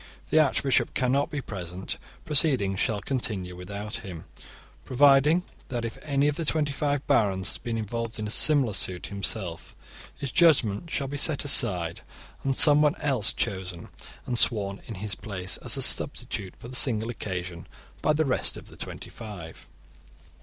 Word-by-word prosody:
If - - -25
the 155 - +5
archbishop 135 -3 +2
cannot 135 +4 +1
be 145 -3 -4
present, 90 -4 -6 0.3
proceedings 130 - +3
shall 105 -3 0
continue 100 -7 -2
without 100 +4 -6
him, 90 -5 -8 0.6
provided 145 +5 +4 0.3
that 120 -2 -3
if 115 - -7
any 140 -1 +1
of 150 - -1
the 170 - -2
twenty 150 -1 0
five 145 0 -1
barons 95 -3 +2
has - - -4
been 115 -1 -4
involved 115 +1 -4
in 110 - -4
a 105 - -4
similar 140 -4 +4
suit 95 -2 0
himself, 95 -3 -4 0.4
his 140 -3 -5
judgement 140 - +3
shall 140 -3 -2
be 145 +2 -5
set 145 0 +1
aside, 90 -11 +3 0.4
and 135 -1 0
someone 150 0 +5
else 135 -9 +1
chosen 90 -3 -4 0.4
and 120 -2 0
sworn 100 -3 +2
in 110 - -6
his 100 +1 -3
place, 95 -3 -4
as - - -1
a - - +2
substitute 95 -2 +1
for - - -11
the 125 - -5
single 115 -3 +3
occasion, 90 -6 -6 0.3
by - - +2
the 155 +1 +1
rest 130 - 0
of - - -12
the - - -14
twenty - - -7
five. 100 -7 -10
115 Hz, 165 wpm, -26 LUFS, 95-140 Hz, 0.6 s, the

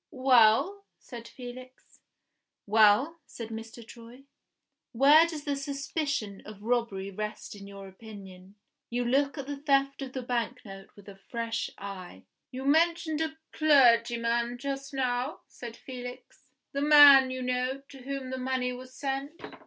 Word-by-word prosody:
"Well?" 260 - +3
said 235 -2 -11
Felix. 255 0 -12 0.7
"Well?" 220 +10 +4
said 230 -2 -8
Mr. 225 +1 -9
Troy. 235 +3 -13 0.7
"Where 290 +7 +6
does 310 -3 -6
the 285 -1 -2
suspicion 275 -6 -3
of 210 -1 -12
robbery 225 -5 -1
rest 210 +1 -6
in 200 -1 -11
your 200 -1 -10
opinion? 195 -2 -13 0.3
You 245 +1 -2
look 280 +4 +1
at 275 - -5
the 285 +1 -5
theft 275 -1 +1
of 260 -2 -6
the 260 - -4
bank 245 0 -3
note 195 -1 -11
with 205 -1 -17
a 195 -1 -12
fresh 230 -1 -3
eye." 185 - -9 0.3
"You 260 +1 -7
mentioned 320 +1 +2
a 315 0 -3
clergyman 235 -4 +3
just 275 +1 -5
now," 255 +1 -2
said 235 -1 -10
Felix. 250 0 -10 0.3
"The 280 - -3
man, 285 -3 +8
you 255 0 -4
know, 255 +2 -2
to 275 - -13
whom 270 0 -5
the 260 - -4
money 255 -1 -1
was 255 +1 -10
sent. 280 +4 -4
250 Hz, 145 wpm, -28 LUFS, 225-275 Hz, 0.7 s, man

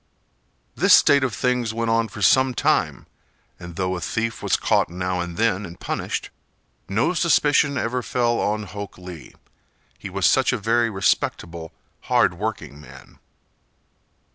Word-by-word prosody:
This - - +6
state 140 -1 +4
of 125 -6 -1
things 125 -1 -1
went 115 0 -1
on 115 0 +2
for 105 0 -7
some 130 +2 +4
time, - - 0 0.5
and 85 -1 -10
though 95 +1 -1
a 90 - -5
thief 115 +4 -3
was - - +1
caught - - +1
now 90 +1 -3
and 85 0 -5
then 110 -3 +1
and 85 -3 -10
punished, - - -4 0.6
no 110 - +1
suspicion 145 -4 +2
ever 125 +1 -1
fell 120 -1 0
on 105 +1 -1
Hok 100 0 -8
Lee, 90 -4 -11 0.6
he 100 - -7
was 95 -1 -1
such 130 +10 +4
a 125 - -1
very 115 +2 +1
respectable, 85 -4 -1 0.3
hard 90 - +3
working 85 -7 -5
man. - - -15
105 Hz, 150 wpm, -22 LUFS, 90-120 Hz, 0.6 s, This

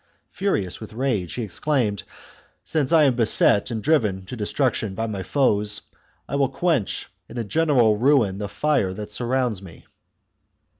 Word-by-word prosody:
Furious 105 - -1
with 110 -1 -10
rage, 110 -8 -1
he 120 - -3
exclaimed, 110 - -1 0.6
"Since 155 -2 0
I 160 -2 +6
am 135 -4 +3
beset 110 -3 +3
and 110 -3 -4
driven 110 -12 +1
to 110 - -7
destruction 110 -2 -1
by 115 - -2
my 105 -4 -4
foes, 105 -1 +1 0.5
I 140 - -2
will 135 -2 +2
quench 145 - 0 0.2
in - - -9
a 120 - -1
general 125 -3 +3
ruin 115 -6 +2
the 105 -1 -4
fire 135 -8 0
that 105 0 -7
surrounds 125 -4 -1
me." 90 -4 -13
115 Hz, 155 wpm, -23 LUFS, 105-140 Hz, 0.6 s, I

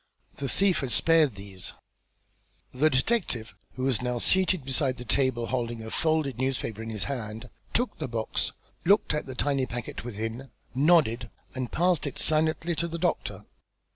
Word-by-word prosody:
The 140 -1 -2
thief 195 -2 +3
has 130 -4 0
spared 160 -7 +4
these." 100 -2 -8 1.0
The 145 +5 +3
detective, 135 - 0 0.2
who 130 - -4
was 130 -4 +2
now 125 -1 -1
seated 185 +2 +3
beside 135 -1 +1
the 125 - -7
table, 130 -1 +2
holding 120 -2 -2
a 110 - -7
folded 155 -5 +1
newspaper 130 -4 -2
in 115 - -5
his 105 -4 -3
hand, 115 0 -5 0.2
took 245 +2 0
the 155 - -2
box, 115 -2 -1 0.3
looked 200 -1 +4
at 150 - -2
the 130 - -6
tiny 135 -1 +1
packet 120 -1 -5
within, 115 +3 -5 0.2
nodded 130 -5 +3 0.2
and 130 -2 -4
passed 175 -3 +2
it 140 - -5
silently 155 +2 +2
to 170 +3 0
the 170 0 -4
doctor. 175 0 -1
130 Hz, 165 wpm, -28 LUFS, 115-155 Hz, 1.0 s, spared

